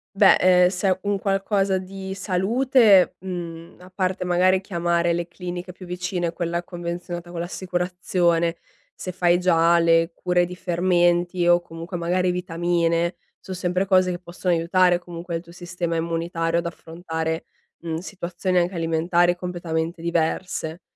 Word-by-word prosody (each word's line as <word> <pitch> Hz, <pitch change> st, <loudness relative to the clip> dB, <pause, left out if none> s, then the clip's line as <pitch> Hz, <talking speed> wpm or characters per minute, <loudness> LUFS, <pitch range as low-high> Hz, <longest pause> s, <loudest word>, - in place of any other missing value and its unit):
Beh, 195 Hz, 0 st, +6 dB
ehm, 180 Hz, -1 st, +5 dB
se 190 Hz, +1 st, -2 dB
è 185 Hz, 0 st, +1 dB
un 200 Hz, -1 st, 0 dB
qualcosa 195 Hz, 0 st, +1 dB
di 190 Hz, +1 st, -6 dB
salute, 205 Hz, +2 st, +3 dB
mhmm, 170 Hz, -3 st, -7 dB
a 180 Hz, +1 st, -15 dB
parte 185 Hz, -1 st, -1 dB
magari 185 Hz, +1 st, +3 dB
chiamare 170 Hz, -2 st, 0 dB
le 170 Hz, 0 st, -2 dB
cliniche 180 Hz, 0 st, -6 dB
più 185 Hz, 0 st, -12 dB
vicine, 175 Hz, -1 st, -3 dB
quella 170 Hz, 0 st, -2 dB
convenzionata 175 Hz, 0 st, -6 dB
con 175 Hz, -1 st, -6 dB
l'assicurazione, 175 Hz, -1 st, 0 dB, 0.4 s
se 185 Hz, -, -5 dB
fai 175 Hz, -1 st, +3 dB
già 170 Hz, -1 st, +4 dB
le 165 Hz, 0 st, +3 dB
cure 180 Hz, -1 st, +1 dB
di 180 Hz, +1 st, -8 dB
fermenti 175 Hz, 0 st, +1 dB
o 175 Hz, 0 st, +5 dB
comunque 165 Hz, +2 st, -8 dB
magari 180 Hz, +1 st, +1 dB
vitamine, 170 Hz, -1 st, 0 dB, 0.2 s
son 190 Hz, -, -8 dB
sempre 185 Hz, +1 st, -1 dB
cose 185 Hz, -1 st, +3 dB
che 175 Hz, -, -2 dB
possono 180 Hz, 0 st, -2 dB
aiutare 175 Hz, +1 st, +3 dB
comunque 175 Hz, -1 st, -7 dB
il 165 Hz, -, -3 dB
tuo 170 Hz, -, -15 dB
sistema 175 Hz, -1 st, -4 dB
immunitario 165 Hz, 0 st, -1 dB
ad 170 Hz, -, -1 dB
affrontare, 160 Hz, -1 st, -4 dB, 0.4 s
mhmm, 165 Hz, -1 st, -3 dB
situazioni 180 Hz, 0 st, -3 dB
anche 175 Hz, +2 st, +2 dB
alimentari 170 Hz, +1 st, +2 dB
completamente 170 Hz, -2 st, -3 dB
diverse. 170 Hz, 0 st, -2 dB
175 Hz, 145 wpm, -23 LUFS, 170-185 Hz, 0.4 s, Beh